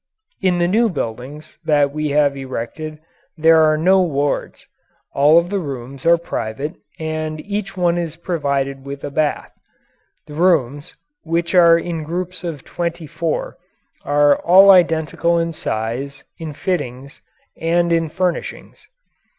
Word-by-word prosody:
In 185 -2 +2
the 175 0 +2
new 225 +5 +2
buildings 140 - -6
that 145 -3 +2
we 150 +1 -2
have 145 -1 +2
erected 135 +4 -6 0.4
there 160 +1 +5
are 155 -1 +3
no 185 +4 +4
wards. 145 -5 -2 0.5
All 150 +3 +5
of 170 +2 +2
the 200 - 0
rooms 135 -2 -6
are 170 0 +6
private 145 -2 -4 0.2
and 155 -1 -4
each 200 +1 -5
one 175 -1 +1
is 165 -2 -4
provided 140 -6 -2
with 140 0 -8
a 145 - -5
bath. 150 +1 -1 0.7
The 150 - -11
rooms 150 -4 +1 0.3
which 170 +2 -2
are 170 -2 +6
in 170 -1 -4
groups 180 +4 -5
of 160 -6 -5
twenty 170 -1 -4
four 160 +2 -3 0.5
are 145 0 +4
all 190 +3 +7
identical 170 -1 +2
in 165 0 0
size, 135 +3 -4 0.2
in 160 -2 -6
fittings, 140 -5 -4 0.3
and 170 +1 +1
in 165 -1 +1
furnishings. 180 +1 -4
155 Hz, 140 wpm, -19 LUFS, 145-170 Hz, 0.7 s, all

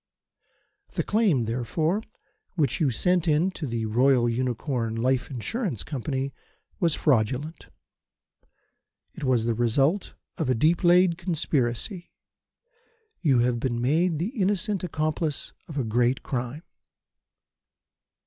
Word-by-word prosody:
"The - - -1
claim, 205 - +2
therefore, 125 - -1 0.5
which 155 -6 +1
you 150 - +4
sent 180 +7 +1
in 160 +5 +3
to 160 -5 -5
the 115 -2 -2
Royal 120 +2 +3
Unicorn 120 -1 -1
Life 130 +3 0
Insurance 140 - -3
Company 135 -1 -3 0.5
was 170 -5 +2
fraudulent. 135 +4 0 1.5
It - - -9
was 125 -4 +2
the 120 - +1
result 135 - +1 0.2
of 155 -5 0
a 130 - +3
deep 160 - +2
laid 175 0 +5
conspiracy. 165 - -1 1.1
You 135 -8 +3
have 120 -1 +1
been 120 -1 -1
made 160 +7 +2
the 175 +7 -1
innocent 195 0 0
accomplice 155 -3 -2
of 155 - -7
a 135 - +1
great 120 +3 +1
crime. 130 +4 -4
140 Hz, 120 wpm, -26 LUFS, 120-170 Hz, 1.5 s, laid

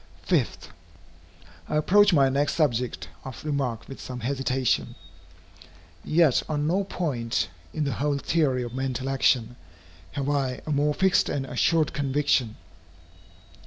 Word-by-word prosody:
5. - - -1 1.0
I - - -1
approach 205 +7 +5
my 140 -5 +5
next 140 +2 0
subject 125 -6 0 0.2
of 130 +2 -9
remark 135 -6 -2
with 135 - -9
some 125 -1 -7
hesitation. 130 -1 0 1.1
Yet 155 -4 +3
on 150 -1 -1
no 185 +6 +1
point, 130 -12 -2 0.2
in 155 - -2
the 140 - -1
whole 145 0 0
theory 140 -4 +1
of 120 -1 -7
mental 130 0 -3
action, 125 -3 +1 0.6
have 140 -1 -3
I 135 -3 -1
a 155 - -3
more 145 +1 +1
fixed 190 -1 +3
and 135 -2 -2
assured 155 +5 +1
conviction. 140 -5 +1
140 Hz, 130 wpm, -26 LUFS, 125-150 Hz, 1.1 s, approach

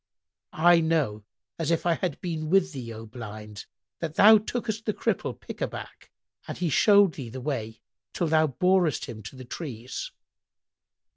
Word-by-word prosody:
I 170 +1 +5
know, 150 -11 0 0.3
as 165 -2 -1
if 165 0 +1
I 170 - +4
had 165 -2 -3
been 160 -3 -3
with 185 -1 +3
thee, 125 -4 -6
O 110 0 -8
Blind, 105 -2 -9 0.3
that 160 -2 -4
thou 215 +1 +8
tookest 220 0 -4
the 215 - -1
Cripple - - -2
pick - - -9
a - - +1
back, - - -10 0.4
and - - -5
he 175 -4 -1
showed 200 +2 +5
thee 130 -5 -7
the 130 +3 -7
way 115 -5 -4 0.3
till 175 - -1
thou 155 -1 +3
borest 175 +1 +2
him 110 - -8
to 110 +6 -10
the 130 -1 -10
trees." 125 -3 -6
155 Hz, 170 wpm, -27 LUFS, 120-175 Hz, 0.4 s, thou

